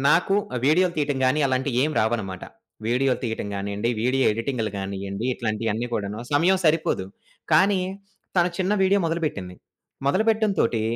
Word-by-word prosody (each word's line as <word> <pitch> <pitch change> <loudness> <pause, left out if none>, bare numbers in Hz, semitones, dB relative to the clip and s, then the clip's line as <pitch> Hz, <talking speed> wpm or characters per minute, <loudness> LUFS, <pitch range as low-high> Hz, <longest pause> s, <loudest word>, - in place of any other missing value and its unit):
నాకు 180 +5 +3 0.2
ఆ - - -1
వీడియోలు 175 +3 +3
తీయటం 145 -3 0
గాని, 130 +4 +2
అలాంటియేం 130 +2 0
రావన్నమాట. 110 -5 -2 0.4
వీడియోలు 125 +2 +1
తీయటం 110 -3 -3
గానియండి, 100 +3 -2
వీడియో 130 +2 +2
ఎడిటింగ్‌లు 115 0 -2
గానియండి, 100 +2 -4
ఇట్లాంటియన్ని 110 0 -2
కూడాను 105 0 -3
సమయం 175 +6 +4
సరిపోదు. 155 - +2 0.5
కానీ 190 +4 +4 0.6
తను 175 0 +4
చిన్న 190 +2 +1
వీడియో 195 +1 +4
మొదలు 165 +1 -1
పెట్టింది. 90 -10 -5 0.5
మొదలు 190 +10 +2
పెట్టడం 220 -1 +3
తోటి 115 -1 +1
130 Hz, 140 wpm, -24 LUFS, 110-165 Hz, 0.6 s, సమయం